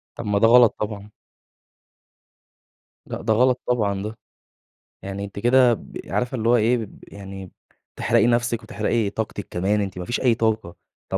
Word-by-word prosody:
طب 115 - -7
ما 105 -1 +1
ده 115 - +5
غلط 120 -1 +6
طبعًا. 105 -1 -5 2.0
لأ، - - -6
ده 110 - +1
غلط 125 +2 +2
طبعًا 100 -5 0
ده. 110 +1 -6 0.9
يعني 100 +1 -5
أنتِ 100 0 -8
كده 125 +2 +4
ب - - -10
عارفة 125 +1 -2
اللي 115 -1 -1
هو 120 - +5
إيه، 115 +2 +3
بب 110 -3 -9
يعني 95 -2 -9 0.5
بتحرقي - - +2
نَفسِك، 120 -1 +1
وتحرقي 105 0 -1
طاقتِك 105 -2 -5
كمان. 100 +4 0
أنتِ 95 -2 -4
ما 90 - -4
فيش 120 - -2
أي 125 -3 +3
طاقة. 110 -5 -1 0.4
طب - - -1
110 Hz, 165 wpm, -23 LUFS, 100-120 Hz, 2.0 s, غلط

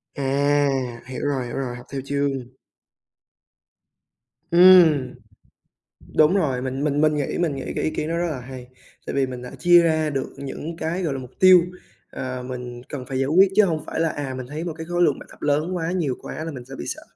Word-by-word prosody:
À! 140 -3 0
Hiểu 130 +1 -5
rồi, 135 -3 -1
hiểu 120 - -6
rồi, 125 -3 -3
học 120 - -12
theo 135 -1 -3
chương. 140 0 0 2.2
Ừm. 170 -7 +6 1.0
Đúng 155 +5 +5
rồi, 135 -9 0
mình 130 +2 -3
mình 145 0 +1
mình 155 -1 +3
nghĩ 145 - -2
mình 165 -5 0
nghĩ 135 - -5
cái - - -1
ý - - +1
kiến 155 0 -3
đó 170 - -1
rất 175 0 0
là 135 - -4
hay, 125 0 -9 0.4
tại - - -4
vì 135 -1 +2
mình 125 -1 -7
đã 125 - -8
chia 175 0 +6
ra 155 -2 +1
được 135 -2 -3
những 150 +4 -6
cái, 175 +3 -2
gọi 150 -4 -1
là, 135 - -4
mục 125 -1 -10
tiêu, 185 -1 +8 0.5
ờ, 130 -1 -5
mình 125 -1 -7
cần 135 -4 -6
phải 130 -1 -4
giải 135 - +1
quyết, 185 +5 +5
chứ 215 - +6
hông 155 -3 -2
phải - - -4
là, 165 -1 +2
à, 140 -3 -4
mình 130 -1 -6
thấy 150 +4 -5
một 170 -3 -4
cái 160 - -6
khối 175 +1 -1
lượng 145 -5 +2
bài - - -12
tập - - -17
lớn 150 +5 0
quá, 165 -1 -2
nhiều 160 -8 -1
quá 155 - -6
là 165 - -5
mình 125 -3 -9
sẽ 135 - -9
bị - - -6
sợ. - - -5
145 Hz, 225 wpm, -23 LUFS, 130-165 Hz, 2.2 s, tiêu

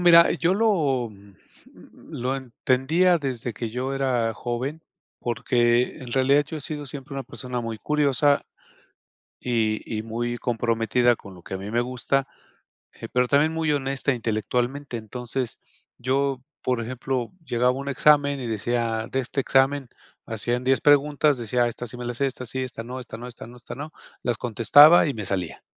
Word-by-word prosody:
mira, 170 -1 +7
yo 175 +3 +1
lo 155 - +2
mm, 100 -1 -17 0.8
lo 130 +2 -2
entendía 135 +7 +2
desde 125 -4 -3
que 115 +2 -4
yo 125 +4 -3
era 125 -4 +1
joven, 125 +8 -4 0.4
porque, 120 +1 +1
en 125 -4 -8
realidad, 135 +2 +4
yo 160 - -6
he - - -9
sido 145 0 -5
siempre 140 +1 -8
una 135 -1 -4
persona 125 -1 -5
muy 115 -1 -4
curiosa, 145 0 +2 1.0
y 110 -3 0 0.2
y - - -5
muy 120 +2 -3
comprometida 120 +1 +1
con 100 -3 -13
lo 90 - -14
que - - -8
a - - -2
mí 100 +3 -7
me 120 - +1
gusta, 130 +2 -1 0.7
eh, - - -8
pero 125 0 +3
también 145 +4 +3
muy 160 -2 0
honesta 140 0 0
intelectualmente, 120 +4 -2
entonces, 120 +2 -4 0.4
yo, 135 +1 0 0.2
por 125 -2 0
ejemplo, 125 0 -3
llegaba 125 -1 +2
a - - -4
un 140 - -5
examen 140 0 +4
y 120 - -4
decía: 115 0 -1
"De 135 - 0
este 135 +2 -2
examen 135 0 +2 0.4
hacían 120 +2 -2
10 135 0 +3
preguntas", 145 -1 +4
decía: 120 +1 +1
"Esta 120 +1 -5
sí 125 - -8
me 125 - -6
la 120 - -3
sé, 140 - +1
esta 130 -1 -6
sí, 130 +2 -3
esta 120 -2 -6
no, 125 +2 -6
esta 115 -2 -9
no, 120 +2 -8
esta 115 -2 -10
no, 120 +1 -13
esta 120 - -9
no, 145 +4 -7 0.3
las 120 -2 0
contestaba 145 +9 +6
y 145 - -1
me 105 - -5
salía", 90 -4 -2
125 Hz, 175 wpm, -24 LUFS, 120-140 Hz, 1.0 s, mira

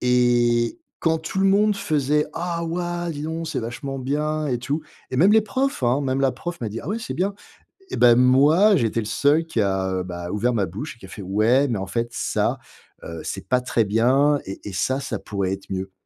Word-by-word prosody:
et 120 - +2 0.2
quand 160 -1 +2
tout 165 +4 -5
le 195 - +4
monde 205 +1 +3
faisait: 150 -3 +1
«Oh 170 0 -3
waouh, 175 0 -3
dis 145 - -6
donc! 160 +1 -4
C'est 155 - -2
vachement 135 +4 -5
bien 150 +3 -1
et 125 -2 0
tout» 140 +6 -3 0.3
et 130 - -3
même 190 +9 +5
les 220 - +6
profs, 265 - -2
hein. 125 +4 +2
Même 135 0 0
la 135 -2 +2
prof 175 +6 -6
m'a 110 - -1
dit: 115 - -5
«Ah - - -7
ouais 220 +3 -1
c'est - - -5
bien» 195 +2 -1 0.6
et - - -3
bah, 120 -1 +6
moi 145 - +5
j'étais 115 -2 0
le - - -6
seul 145 +8 +2
qui 120 -9 -1
a, 95 -1 0
heu, 90 -1 -1
bah, 85 -1 -6
ouvert 120 +4 0
ma 100 -5 0
bouche, 125 - -7
qui - - -12
a - - -17
fait: 100 - -9
«Ouais 110 +9 +3
mais 110 -5 -1
en 95 - -4
fait 115 +3 -2
ça, - - -1 0.4
heu, 85 -1 -7
c'est - - -6
pas 125 - +3
très 120 -2 +1
bien 130 +7 +3
et 95 - -7
et - - -9
ça 130 +9 0
ça 115 -6 -4
pourrait 100 -2 -2
être 95 0 -8
mieux». 95 0 -3
130 Hz, 230 wpm, -23 LUFS, 115-160 Hz, 0.6 s, les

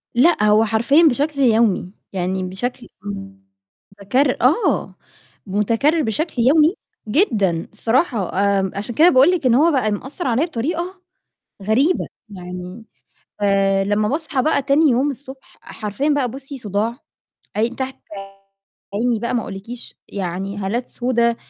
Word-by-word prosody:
لأ، 285 -3 +4
هو 215 +1 +4
حرفيًا 235 +9 +3
بشكل 285 +3 -1
يومي، 220 -7 +2 0.2
يعني 185 0 -2
بشكل 240 +7 -4 1.1
مُتكرر، 255 +7 +1
آه، 285 - +2 0.5
مُتكرر 230 - +1
بشكل 300 - -2
يومي 310 +6 +5 0.3
جدًا 210 - +1
الصراحة، 230 - 0
آآ 200 -2 +1
عشان 210 +3 -4
كده 335 +3 +6
باقول 270 +5 +5
لِك 340 -7 -1
إن 240 -1 +4
هو 325 +5 +4
بقى 250 -7 +1
مأثر 265 - -4
عليّا 255 +7 +2
بطريقة 340 +7 -4 0.6
غريبة، 260 - +2 0.2
يعني 180 +2 -8 0.5
فلمّا 195 +1 +2
باصحى 300 -2 -1
بقى 300 -2 +2
تاني 280 +2 +3
يوم 265 +4 +1
الصبح، 265 0 -12
حرفيًا 215 +7 -3
بقى 285 -4 +1
بُصي 270 +1 -8
صُداع، 225 +2 -2 0.6
عين 230 +3 0
تحت 265 0 -4 1.0
عيني 230 +2 +1
بقى 240 +1 -2
ما 235 - +1
أقولكيش، 210 +5 -8
يعني 195 +1 -4
هالات 215 +6 -2
سودا، 235 -2 0
235 Hz, 130 wpm, -20 LUFS, 205-280 Hz, 1.1 s, كده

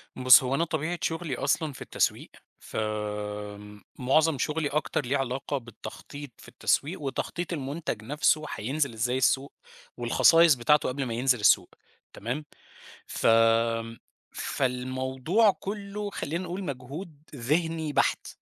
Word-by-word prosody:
بُص، 130 +2 +7
هو 130 +2 0
أنا 165 - +1
طبيعة 160 +2 -2
شُغلي 160 -5 -2
أصلًا 145 +2 0
في - - -13
التسويق، - - -1 0.3
فمُعظَم 105 +7 -2
شُغلي 150 0 0
أكتر 145 -2 -1
ليه 140 +3 +1
علاقة 135 +2 -2
بالتخطيط 135 +3 -9
في - - -15
التسويق، 155 +4 -1
وتخطيط 170 +5 -3
المنتج 140 -6 -4
نفسه 150 +4 +1
هينزل 135 +3 -1
إزاي 125 +3 0
السوق 135 +1 +1 0.4
والخصائص 165 -3 +5
بتاعته 140 +3 +3
قبل 135 +2 -2
ما 115 - -3
ينزل 125 0 +2
السوق 105 - +4 0.4
تمام؟ 125 +8 -4 0.6
ف - - -1 1.1
فالموضوع 130 - +1
كلّه 205 +1 -5
خلّينا 170 -1 -4
نقول 180 +2 -5
مجهود 145 +3 -7
ذهني 160 +4 -1
بحت، - - +1
140 Hz, 120 wpm, -27 LUFS, 125-160 Hz, 1.1 s, بُص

